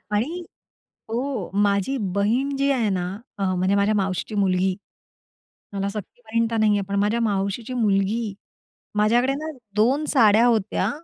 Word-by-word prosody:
आणि 315 +12 -1 0.7
हो, 240 -3 -2
माझी 200 +6 +1 0.2
बहीण 240 +8 +1
जी 275 +1 +2
आहे 240 -6 +1
ना, 185 -2 -1 0.3
अ, 200 - -2
म्हणजे 185 +2 +1
माझ्या 200 +2 +2
मावशीची 195 +1 -2
मुलगी, 190 -2 +1 1.0
मला 200 0 -1
सख्खी 210 +3 -8
बहीण 230 0 0
तर 230 - 0
नाही 215 -1 +3
आहे, - - 0
पण 200 - -1
माझ्या 210 +3 +1
मावशीची 205 +3 -1
मुलगी. 210 -1 0 0.6
माझ्याकडे 235 +5 +3
ना 310 +2 -5 0.2
2 255 +8 +2
साड्या 225 -3 +5
होत्या, 220 -4 +1
215 Hz, 145 wpm, -23 LUFS, 200-240 Hz, 1.0 s, साड्या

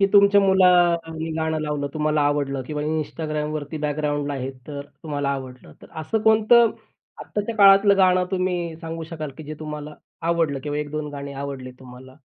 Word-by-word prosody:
की 195 - +5
तुमच्या 200 0 +6
मुलांनी 175 -4 +3
गाणं 160 0 -1
लावलं, 150 -2 -2
तुम्हाला 155 0 +1
आवडलं 145 -2 0
किंवा 150 +3 -4
Instagramवरती 155 -1 -3
बॅकग्राऊंडला 145 -1 -1
आहे, 135 -1 -4 0.2
तर 145 -2 -6 0.2
तुम्हाला 145 -3 -2
आवडलं, 130 -2 -6
तर - - -13
असं 160 +8 -1
अ, - - -6
कोणतं 220 +1 +5 0.5
आत्ताच्या 210 +2 -4
काळातलं 200 0 +7
गाणं 185 -1 +4
तुम्ही 180 -3 -1
सांगू 165 0 -6
शकाल, 155 -3 -5
की - - -7
जे 155 +1 -6
तुम्हाला 150 -1 -6 0.3
आवडलं 165 -5 +1
किंवा 150 0 -3
1-2 150 0 -4
गाणी 140 0 -6
आवडली 135 -2 -6
तुम्हाला? 130 0 -13
155 Hz, 160 wpm, -23 LUFS, 145-180 Hz, 0.5 s, काळातलं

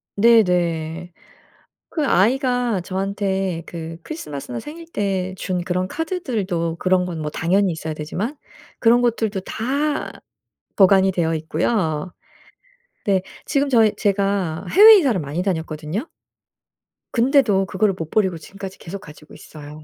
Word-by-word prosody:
네네. 175 -6 +2 0.8
그 305 -4 -1
아이가 245 -1 +2
저한테 190 -2 -2
그 165 -1 -7
크리스마스나 145 - -6
생일 330 +3 -9
때 190 -2 -1
준 180 -2 -2
그런 185 0 -1
카드들도 210 - -2
그런 185 0 +2
건 170 -3 -5
뭐 150 - -3
당연히 190 +3 +1
있어야 160 -1 -5
되지만 185 - -4 0.4
그런 240 +1 +4
것들도 225 -4 0
다 285 +9 -2 0.6
보관이 190 -1 +5
되어 165 -3 0
있고요. 160 +1 -1 0.9
네 195 -2 +2 0.2
지금 280 -1 +1
저희 225 -4 +4
제가 195 -4 0
해외 430 +2 +9
이사를 260 - +2
많이 150 +5 -3
다녔거든요. 165 - -3 1.0
근데도 235 -6 +3
그거를 195 +2 +1
못 165 -4 -6
버리고 190 -6 +1
지금까지 195 +4 -9
계속 190 +4 -7
가지고 150 -3 -14
있어요. 150 0 -11
190 Hz, 285 characters per minute, -21 LUFS, 165-225 Hz, 1.0 s, 해외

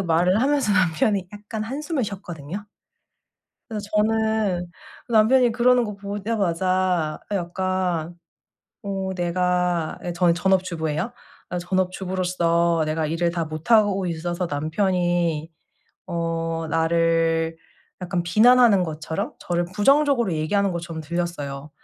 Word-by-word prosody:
말을 180 +4 +2
하면서 275 -5 +2
남편이 185 +1 +1
약간 210 +1 -6
한숨을 285 +5 -3
쉬었거든요? 190 -2 -7 1.1
그래서 210 -2 -5
저는 215 -4 +1 0.4
남편이 235 +2 +4
그러는 245 +1 +4
거 210 -2 -5
보자마자 185 -5 -1
약간 180 -2 -1 0.7
어 195 -1 -3
내가 180 -2 0
예 175 - -2
저는 170 0 +3
전업 190 +1 +2
주부예요. 165 +3 -3 0.4
아 180 - -2
전업 185 +1 0
주부로서 175 -3 0
내가 155 0 -1
일을 165 +2 0
다 170 -1 -2
못하고 195 +5 +2
있어서 175 +1 -2
남편이 170 0 0 0.6
어 165 -1 -2
나를 165 0 +1 0.4
약간 180 -1 -2
비난하는 215 +2 +5
것처럼? 160 0 -4
저를 175 0 -1
부정적으로 275 - +3
얘기하는 190 +6 +1
것처럼 170 -1 -5
들렸어요. 155 -4 -4
180 Hz, 270 characters per minute, -23 LUFS, 165-205 Hz, 1.1 s, 비난하는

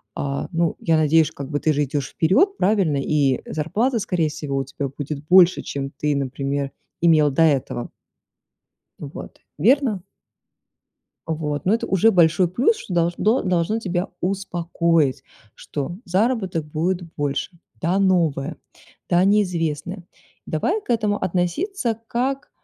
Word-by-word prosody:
А, 140 0 -3
ну, 170 -1 0
я 165 -1 +2
надеюсь, 155 0 +3
как 140 -1 -8
бы, 145 -1 -1
ты 155 - +2
же 145 0 +1
идёшь 140 0 -3
вперёд, 375 - +2
правильно, 185 -7 +2
и 140 -2 +1
зарплата 225 - 0
скорее 175 -6 0
всего 150 -2 -4
у 135 - 0
тебя 140 +1 -4
будет 145 +1 -6
больше, 180 0 +6
чем 135 -1 -5
ты, 150 0 -1
например, 140 +1 -2 0.3
имел 160 -3 +5
до 150 +5 +3
этого. 140 -5 0 1.1
Вот, - - -9 0.2
верно? 240 -5 +2 1.2
Вот, 150 -2 -3
но 190 - +3
это 230 - 0
уже 195 +4 +4
большой 175 -1 +4
плюс, 255 - +2
что 200 - -7
долждно 175 +8 +1
должны 185 +4 0
тебя 180 -2 -2
успокоить, 170 -6 0 0.3
что 150 +5 -5
заработок 190 -4 0
будет 170 +5 -1 0.2
больше. 145 +4 -3 0.2
Да, 180 +4 +1
новое, 165 -6 +1 0.5
да, 175 0 +4
неизвестное. 180 -3 0 0.4
Давай 355 - -1
к - - -26
этому 215 -3 +1
относиться 225 - -1
как, 265 +4 -2
170 Hz, 135 wpm, -22 LUFS, 150-195 Hz, 1.2 s, больше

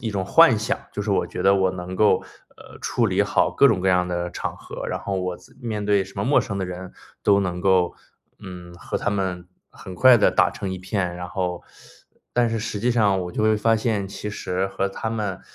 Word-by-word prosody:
一 115 - -3
种 95 -2 -2
幻 130 - +6
想， 110 - -1
就 105 - -3
是 105 - -3
我 95 - +1
觉 - - -5
得 100 - +5
我 95 -1 +2
能 90 0 -6
够， 105 -3 +3 0.3
呃， - - -14
处 - - 0
理 - - +2
好 - - +1
各 140 - +5
种 105 -7 +1
各 95 - +1
样 90 -1 +2
的 85 0 -2
场 - - -5
合， - - -8
然 - - -2
后 95 -1 -2
我 90 -1 -3
自 - - -20
面 110 -4 -3
对 100 -1 +2
什 95 - -15
么 100 - -1
陌 145 - +4
生 100 - -4
的 95 - -1
人 90 0 -7 0.3
都 100 -1 +4
能 90 -2 -2
够， 90 -2 +2 0.4
嗯， 90 -2 -10
和 85 - -5
他 - - -1
们 95 -3 -2 0.2
很 95 - -10
快 130 +5 +7
地 110 - +4
打 - - +3
成 95 -2 -5
一 95 - -5
片， 90 -1 -2
然 90 0 -6
后， 90 -2 -3 0.7
但 120 -1 +2
是 115 - -2
实 110 -1 -4
际 120 +3 +1
上 105 -5 +2
我 90 - -6
就 110 - -2
会 110 0 +3
发 115 +1 +2
现 110 -3 -1
其 105 +1 -6
实 95 -2 -2
和 95 0 -2
他 110 +3 -4
们， 105 -5 -3
95 Hz, 255 characters per minute, -23 LUFS, 90-105 Hz, 0.7 s, 快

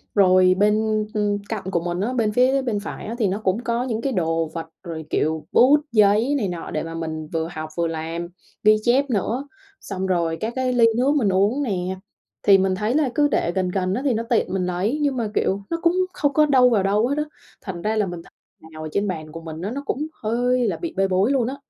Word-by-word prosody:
Rồi 185 -2 +5
bên, 215 +1 +2
ưm, 205 -1 0
cạnh 220 -4 -3
của 170 - +1
mình 175 +1 -3
á, 245 +5 -1
bên 220 -4 +1
phía 260 +4 +3
bên 230 -5 -1
phải 205 - -7
á 230 +3 -4
thì 210 - +2
nó 195 +3 -2
cũng 195 +6 0
có 235 +1 -1
những 230 -3 -2
cái 270 -1 -1
đồ 165 -3 0
vật 165 -1 -5 0.2
rồi, 160 -3 -6
kiểu, 155 0 -1
bút, 280 +4 +6
giấy, 215 +5 +4
này 210 - -1
nọ 175 -2 -6
để 155 - -2
mà 165 0 -6
mình 160 -1 -4
vừa 160 0 -2
học 155 0 -6
vừa 170 -1 +1
làm, 165 +1 -4 0.4
ghi 215 +1 +6
chép 265 +3 +2
nữa, 235 +5 -1 0.3
xong 190 -1 -4
rồi 170 -3 0
các 225 +2 -2
cái 255 -1 0
ly 235 -2 +5
nước 275 +4 +2
mình 220 -9 +2
uống 205 +9 +2
nè. 190 -5 -2 0.5
Thì 195 -1 +7
mình 190 0 +1
thấy 210 +5 -1
là 295 -3 +2
cứ 290 -1 +4
để 170 - 0
gần 185 -1 -1
gần 185 0 -1
á, 250 - -1
thì 260 - +3
nó 225 +1 -1
tiện 230 -4 0
mình 185 -2 0
lấy 190 +11 -1
nhưng 280 -3 +1
mà, 225 -3 -1
kiểu, 195 +1 0
nó 335 - -1
cũng 340 0 +3 0.2
không 285 -2 0
có 305 +1 +5
đâu 255 -3 +5
vào 210 -5 +2
đâu 210 +4 +2
hết 285 +2 -1
á. 300 - +1 0.4
Thành 180 -4 -6
ra 215 +3 -1
là 210 -2 +2
mình 175 -2 -6
thấy - - -19 0.4
nào 155 0 -9
ở 155 - -5
trên 205 +3 0
bàn 155 -4 -5
của 165 +1 -8
mình 160 0 -8
á 200 +4 -3
nó 280 +2 -4
cũng 300 +4 -2 0.2
hơi 245 +2 +1
là - - -1
bị 340 -2 -5
bê 195 0 +3
bối 190 +7 +2
luôn 255 -4 +1
á. 265 - -3
205 Hz, 255 wpm, -22 LUFS, 180-245 Hz, 0.5 s, Thì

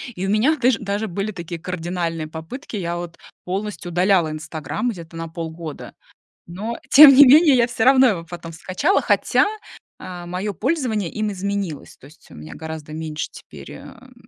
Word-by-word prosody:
и 180 - -4
у - - -2
меня 225 +10 +3
даж 250 -1 +3
даже 205 +1 -3
были 200 +3 -3
такие 170 -3 -7
кардинальные 170 -2 -4
попытки, 160 - -8
я 175 -3 -3
вот 175 -1 -7 0.3
полностью 185 -2 -4
удаляла 180 -1 +2
"Инстаграм" 155 - -4
где-то 170 -6 -8
на 165 0 -5
полгода. 160 -1 -7 0.5
Но, 210 +7 -5
тем 295 +1 +10
не 285 +2 +9
менее, 295 +2 +7
я 240 -2 +4
всё 235 -2 -2
равно 265 0 +6
его 180 -7 -2
потом 170 0 -9
скачала, 185 - 0
хотя, - - +2 0.5
э, 180 -1 -8
моё 185 +4 -3
пользование 225 - -1
им 215 -1 -2
изменилось, 195 -5 -4
то - - -16
есть 150 +3 -19
у - - -13
меня 75 +1 -10
гораздо 160 -1 -8
меньше 155 -1 -5
теперь, - - -12
эм, - - -13
180 Hz, 170 wpm, -21 LUFS, 165-215 Hz, 0.5 s, тем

